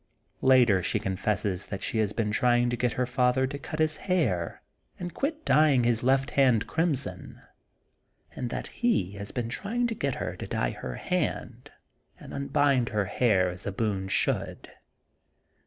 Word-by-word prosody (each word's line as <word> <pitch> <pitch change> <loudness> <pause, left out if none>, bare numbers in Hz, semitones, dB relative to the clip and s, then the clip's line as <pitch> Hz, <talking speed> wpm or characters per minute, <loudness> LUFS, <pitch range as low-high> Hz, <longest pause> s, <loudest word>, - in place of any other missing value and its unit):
Later 125 -7 +5
she - - 0
confesses 95 0 -2
she 110 - -2
has 105 -2 +1
been 105 -1 -1
try 120 +2 +3
ing 120 0 +1
to - - 0
get 120 0 0
her 125 - 0
father 125 +1 +2
to 140 +2 -5
cut 155 - -6
his 155 0 +2
hair 150 - -1 0.3
and 175 -1 -6
quit 310 +3 -3
dyeing 150 -5 +4
his 120 -1 +2
left 135 +2 +2
hand 125 -6 +3
crimson 140 - -2 1.0
and 125 - -3
that - - -4
he 170 - 0
has 100 0 -5
been 120 -2 -3
trying 225 - -2
to 235 - -1
get 140 - -2
her - - -4
to - - -6
dye - - -1
her 60 - -6
hand - - -3 0.5
and - - -11
unbind 140 -3 +1
her 105 -2 0
hair 95 -3 +2
as 90 +2 -8
a - - -1
Boone 100 -2 -2
should. 95 - -1
120 Hz, 170 wpm, -27 LUFS, 100-140 Hz, 1.0 s, Later